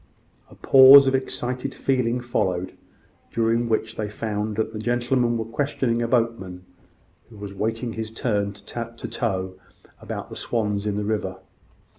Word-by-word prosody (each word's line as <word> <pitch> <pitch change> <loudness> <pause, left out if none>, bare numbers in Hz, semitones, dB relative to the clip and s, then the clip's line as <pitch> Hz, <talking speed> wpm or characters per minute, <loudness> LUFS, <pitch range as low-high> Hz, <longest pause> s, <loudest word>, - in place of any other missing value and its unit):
A - - -15
pause 135 +1 +8
of 135 - +1
excited 130 0 -3
feeling 125 -2 0
followed, 95 -6 -1 0.6
during 115 +1 +1
which 110 0 -1
they 105 -1 -3
found 105 0 -3
that 110 +1 -2
the 110 - -5
gentlemen 120 +1 +1
were 110 - -3
questioning 120 -1 -1
a 115 - 0
boatman, 115 -7 -1 0.6
who 110 - -14
was 100 -1 -7
awaiting 115 +4 -3
his 110 -1 -5
turn 105 -3 -1
to 115 +3 -7
tow, 95 -1 -2 0.5
about - - -6
the - - -7
swans 105 -3 -2
in 105 - -1
the 105 0 -2
river. 100 -3 -2
115 Hz, 150 wpm, -23 LUFS, 105-120 Hz, 0.6 s, pause